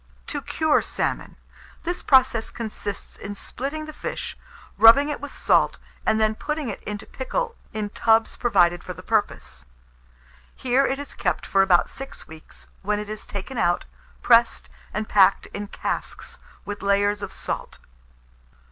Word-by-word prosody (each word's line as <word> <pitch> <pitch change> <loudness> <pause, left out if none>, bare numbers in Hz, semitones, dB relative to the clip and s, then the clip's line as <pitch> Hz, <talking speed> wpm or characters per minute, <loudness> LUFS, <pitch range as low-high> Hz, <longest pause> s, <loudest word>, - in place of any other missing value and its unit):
TO 290 - -4
CURE 315 +2 +2
SALMON. - - -2 0.5
This 350 +1 -2
process 255 -4 +4
consists 210 -3 -5
in 205 0 -6
splitting 280 +9 -4
the 310 - -8
fish, - - -5 0.4
rubbing 275 +6 +8
it 295 - -3
with - - -6
salt, - - +2 0.3
and 220 - +3
then 215 0 +3
putting 300 +3 -3
it 205 - -6
into 210 0 -5
pickle 465 - -3 0.2
in 210 -1 -3
tubs 225 0 +3
provided 175 -7 +3
for - - -6
the - - -12
purpose. - - -1 0.9
Here 260 +2 +2
it 270 - -1
is 285 0 -7
kept - - -1
for 195 - +3
about 185 -2 +4
six 270 0 -8
weeks, 160 0 -10 0.2
when 210 +1 0
it 210 0 -5
is 215 - -6
taken 205 +5 -5
out, 175 0 +2 0.4
pressed 235 -1 +4 0.2
and 215 0 -3
packed 195 -1 +5
in 205 0 -4
casks, - - -4 0.3
with 205 0 -5
layers 205 +1 +2
of - - -5
salt. - - -5
220 Hz, 155 wpm, -24 LUFS, 205-270 Hz, 0.9 s, rubbing